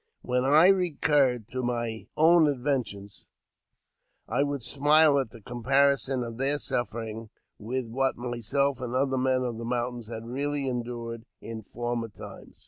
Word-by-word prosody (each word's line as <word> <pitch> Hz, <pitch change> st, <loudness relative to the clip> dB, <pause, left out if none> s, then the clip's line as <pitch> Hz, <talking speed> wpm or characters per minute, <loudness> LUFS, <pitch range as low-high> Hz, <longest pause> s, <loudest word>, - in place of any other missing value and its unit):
When 125 Hz, 0 st, 0 dB
I 150 Hz, +5 st, +6 dB
recurred 145 Hz, -, +2 dB
to 130 Hz, -, -3 dB
my 120 Hz, -2 st, -3 dB
own 160 Hz, 0 st, +5 dB
adventures, 120 Hz, -, -3 dB, 1.0 s
I -, -, 0 dB
would 140 Hz, -3 st, -1 dB
smile 145 Hz, +2 st, +5 dB
at 130 Hz, -4 st, -2 dB
the 115 Hz, 0 st, -14 dB
comparison 135 Hz, +2 st, +1 dB
of 115 Hz, 0 st, -7 dB
their 140 Hz, +2 st, +3 dB
sufferings 115 Hz, -4 st, -4 dB, 0.3 s
with 125 Hz, +3 st, -4 dB
what 135 Hz, +4 st, 0 dB
myself 125 Hz, +3 st, -1 dB
and 125 Hz, 0 st, -4 dB
other 135 Hz, 0 st, +1 dB
men 130 Hz, 0 st, +1 dB
of 120 Hz, -2 st, -4 dB
the -, -, -5 dB
mountains 120 Hz, -1 st, -3 dB
had 115 Hz, 0 st, -7 dB
really 140 Hz, +3 st, -2 dB
endured 120 Hz, -2 st, -5 dB
in 115 Hz, -1 st, -7 dB
former 120 Hz, +1 st, -4 dB
times. -, -, -12 dB
125 Hz, 145 wpm, -27 LUFS, 115-140 Hz, 1.0 s, I